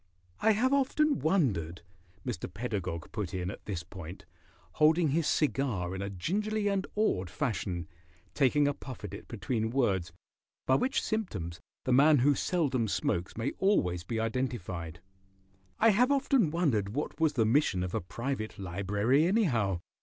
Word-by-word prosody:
"I 220 Hz, 0 st, +4 dB
have 255 Hz, +6 st, +2 dB
often 285 Hz, +2 st, +2 dB
wondered," 105 Hz, -, 0 dB, 0.4 s
Mr. 85 Hz, -, -4 dB
Pedagog 95 Hz, -6 st, -4 dB
put 100 Hz, -5 st, -4 dB
in 90 Hz, 0 st, -2 dB
at -, -, -11 dB
this 95 Hz, -5 st, -4 dB
point, 90 Hz, -2 st, -10 dB, 0.6 s
holding 160 Hz, +1 st, +5 dB
his 155 Hz, +2 st, +1 dB
cigar 125 Hz, -, 0 dB
in 95 Hz, -, -4 dB
a 100 Hz, -, -3 dB
gingerly 205 Hz, -, -1 dB
and 195 Hz, -1 st, -1 dB
awed 95 Hz, -, +1 dB
fashion, 95 Hz, -, -2 dB, 0.5 s
taking 145 Hz, +1 st, +3 dB
a 145 Hz, -, +1 dB
puff 130 Hz, -4 st, -9 dB
at 100 Hz, -2 st, -6 dB
it 100 Hz, -, -9 dB
between 110 Hz, +1 st, -2 dB
words, 100 Hz, -10 st, 0 dB, 0.5 s
by 130 Hz, -, +3 dB
which 260 Hz, -, +1 dB
symptoms 100 Hz, -, -3 dB, 0.3 s
the 130 Hz, -, +2 dB
man 145 Hz, +4 st, +6 dB
who 140 Hz, +3 st, +4 dB
seldom 135 Hz, -8 st, 0 dB
smokes 90 Hz, -2 st, -1 dB
may 115 Hz, +4 st, -1 dB
always 90 Hz, -, +2 dB
be 115 Hz, +4 st, -3 dB
identified, 110 Hz, -9 st, -3 dB, 0.8 s
"I 225 Hz, -, +5 dB
have 245 Hz, +6 st, +4 dB
often 270 Hz, -, +3 dB
wondered 125 Hz, -, 0 dB
what 150 Hz, -, -3 dB
was 160 Hz, -2 st, +3 dB
the 115 Hz, -3 st, +2 dB
mission 110 Hz, -6 st, +2 dB
of 90 Hz, -, -4 dB
a -, -, 0 dB
private 110 Hz, +5 st, -4 dB
library, 100 Hz, -, +1 dB
anyhow. 120 Hz, -, +1 dB
120 Hz, 155 wpm, -30 LUFS, -, 0.8 s, man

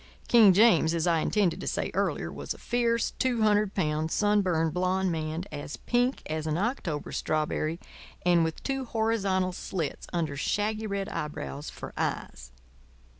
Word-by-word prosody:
King 225 Hz, -5 st, +7 dB
James, 180 Hz, -5 st, +5 dB
as 165 Hz, 0 st, 0 dB
I 170 Hz, -2 st, +3 dB
intended 190 Hz, +1 st, +1 dB
to -, -, -5 dB
say -, -, -1 dB
earlier, -, -, -1 dB
was -, -, -5 dB
a -, -, -13 dB
fierce, 235 Hz, -1 st, 0 dB
two 245 Hz, -4 st, +1 dB
hundred 210 Hz, -1 st, +2 dB
pound, 155 Hz, -3 st, 0 dB
sunburned, 185 Hz, -6 st, +2 dB
blond 185 Hz, +1 st, +1 dB
man, 160 Hz, +1 st, -3 dB
as 145 Hz, 0 st, -6 dB
pink 245 Hz, +2 st, 0 dB
as 155 Hz, 0 st, -3 dB
an 155 Hz, 0 st, 0 dB
October 190 Hz, -, -2 dB
strawberry, 155 Hz, +1 st, -1 dB, 0.5 s
and 175 Hz, -2 st, +5 dB
with 160 Hz, 0 st, -3 dB
two 270 Hz, -1 st, -2 dB
horizontal 210 Hz, -5 st, 0 dB
slits 175 Hz, -3 st, -4 dB
under 160 Hz, -5 st, -1 dB
shaggy 215 Hz, +9 st, -1 dB
red 200 Hz, -1 st, -2 dB
eyebrows 150 Hz, -1 st, -5 dB
for -, -, -9 dB
eyes. -, -, -3 dB
185 Hz, 155 wpm, -28 LUFS, 160-215 Hz, 0.5 s, King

